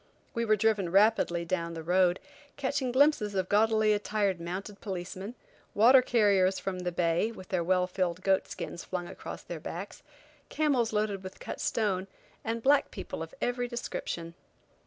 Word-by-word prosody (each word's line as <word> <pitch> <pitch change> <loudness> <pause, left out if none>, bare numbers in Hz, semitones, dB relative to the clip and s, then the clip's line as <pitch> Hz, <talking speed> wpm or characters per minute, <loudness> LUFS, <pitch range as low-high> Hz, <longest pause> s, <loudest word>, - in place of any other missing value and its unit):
We 235 0 -1
were 215 -1 +4
driven 210 -3 +1
rapidly 195 -4 +3
down 170 -1 -2
the 165 - -6
road, 180 +1 +3 0.4
catching 275 -2 -1
glimpses 255 -6 +3
of 185 -1 -1
gaudily 215 0 +4
attired 205 -3 0
mounted 190 +4 -6
policemen, 190 +3 -5 0.4
water 250 +5 +7
carriers 200 -6 +3
from 190 -2 -4
the 180 0 -2
bay, 170 +5 +1
with 185 -5 -11
their 180 -3 0
well 180 +1 +2
filled 180 -1 -2
goat 195 -1 +2
skins 170 - -6
flung 180 -1 -4
across - - -8
their - - -6
backs, - - -7 0.5
camels 270 -7 +1
loaded 210 -2 -1
with 185 0 -9
cut - - -6
stone, 195 -4 0 0.4
and 230 0 -3
black 280 +1 +4
people - - -6
of - - -7
every 245 0 0
description. 170 -8 -5
200 Hz, 160 wpm, -29 LUFS, 180-225 Hz, 0.5 s, water